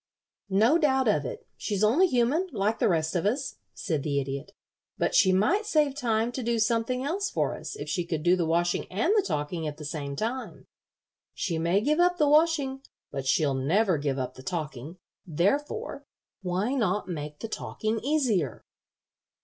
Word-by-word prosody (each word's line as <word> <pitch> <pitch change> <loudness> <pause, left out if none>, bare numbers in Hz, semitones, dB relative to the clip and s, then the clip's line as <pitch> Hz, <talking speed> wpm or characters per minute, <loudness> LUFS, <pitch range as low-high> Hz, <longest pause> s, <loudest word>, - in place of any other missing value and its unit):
"No 225 - +4
doubt 265 -5 +2
of 150 -10 +2
it; - - -6
she's 205 -1 -2
only 280 - +5
human, 270 +6 +1
like 210 +3 0
the 235 - +3
rest 160 -1 0
of 175 +3 +1
us," 260 +5 -2 0.2
said 155 -5 -2
the 140 0 0
Idiot. 135 0 -5 0.5
"But - - 0
she 190 - +5
might 345 - +2
save 300 -7 +2
time 230 -4 0
to 255 - -4
do 235 0 0
something 230 +3 +1
else 385 +8 -1
for - - -1
us - - -7
if 430 - -7
she 180 -3 -1
could 160 -3 -3
do 175 +1 +5
the 170 -3 0
washing 175 +2 0
and 220 - +1
the 425 - +5
talking 160 - -3
at 150 0 -5
the 155 - -8
same 145 -2 -4
time. 235 - -4 0.7
She 165 -4 -2
may 170 +5 +2
give 300 +7 +1
up 355 0 +4
the 300 - +3
washing, 295 -3 +3 0.3
but 135 -1 -4
she'll 145 0 +2
never 165 +7 +2
give 140 -2 -1
up 130 -1 -3
the - - -12
talking. 155 -1 -5 0.3
Therefore, 285 - -1 0.3
why 190 +7 -1
not 210 -6 0
make 150 -4 -5
the 225 - -6
talking 220 0 -3
easier?" 240 - 0
205 Hz, 180 wpm, -27 LUFS, 160-265 Hz, 0.7 s, only